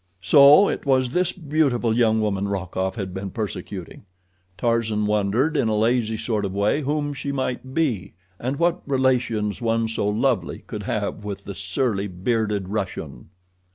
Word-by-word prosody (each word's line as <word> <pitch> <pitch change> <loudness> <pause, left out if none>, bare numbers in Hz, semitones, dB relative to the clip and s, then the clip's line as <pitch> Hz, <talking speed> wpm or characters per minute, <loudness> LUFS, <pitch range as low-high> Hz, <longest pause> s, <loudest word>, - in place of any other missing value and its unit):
So 140 - +7
it - - -2
was 130 -2 +2
this 180 0 +2
beautiful 140 -8 0
young 110 -2 +3
woman 100 -2 0
Rokoff 95 0 -2
had 95 -5 -5
been 95 +1 -4
persecuting. 95 -3 -6 0.5
Tarzan 115 -3 0
wondered 105 +9 +1
in 115 - +2
a 110 -1 +1
lazy 115 0 +1
sort 110 -1 -1
of 95 -2 -3
way 105 +9 +1
whom 145 +1 -1
she 140 +1 -4
might 130 -1 -3
be, 120 - -1 0.2
and 130 +3 -2
what 175 +2 +1
relations 125 -6 +1
one 115 -1 +1
so 110 -2 -1
lovely 120 +4 0
could - - -6
have 105 - -3
with 100 -1 -6
the 100 - -6
surly, 100 +2 -1
bearded 105 +1 -1
Russian. 90 -9 -5
110 Hz, 155 wpm, -23 LUFS, 100-130 Hz, 0.5 s, So